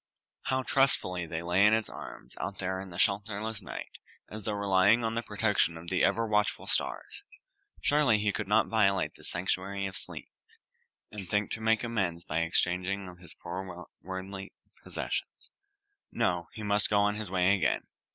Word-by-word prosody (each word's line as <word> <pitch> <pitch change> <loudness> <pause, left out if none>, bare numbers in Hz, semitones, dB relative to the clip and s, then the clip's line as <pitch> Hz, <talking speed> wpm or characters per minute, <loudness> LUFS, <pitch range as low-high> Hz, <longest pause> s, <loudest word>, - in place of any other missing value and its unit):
How 130 0 +1
trustfully 90 -11 +2
they 80 +1 -4
lay 90 +3 +3
in 105 +1 +7
its 110 -1 -1
arms - - -9
out 95 0 -4
there 95 0 -2
in 95 - -8
the 85 - -9
shelterless 105 +2 +1
night, - - -8 0.3
as 105 -1 -7
though 105 - 0
relying 100 +3 +4
on 115 0 0
the 115 - 0
protection 105 -6 +1
of 85 +2 -8
the 90 - +2
ever 115 +4 +3
watchful 105 -1 +1
stars. - - 0 0.6
Surely 145 -7 +4
he 105 0 +1
could 105 0 -3
not 105 +2 +4
violate 100 -4 +2
this - - -9
sanctuary 95 +2 -1
of 95 -1 -4
sleep, - - -6 0.8
and 95 -4 -7
think 105 0 +1
to 110 - -3
make 110 +1 +3
amends 95 -8 -1
by 80 -1 -1
exchange 90 +2 +1
of 95 -2 -4
his 85 -3 -9
poor 90 0 -6 0.2
worldly 95 +1 -6 0.3
possessions. - - -4 0.6
No! 90 -7 0
he 110 - -7
must 105 0 +1
go 105 - +3
on 105 0 +3
his 105 -2 -5
way 95 +1 +3
again. 95 - +1
100 Hz, 175 wpm, -30 LUFS, 90-105 Hz, 0.8 s, in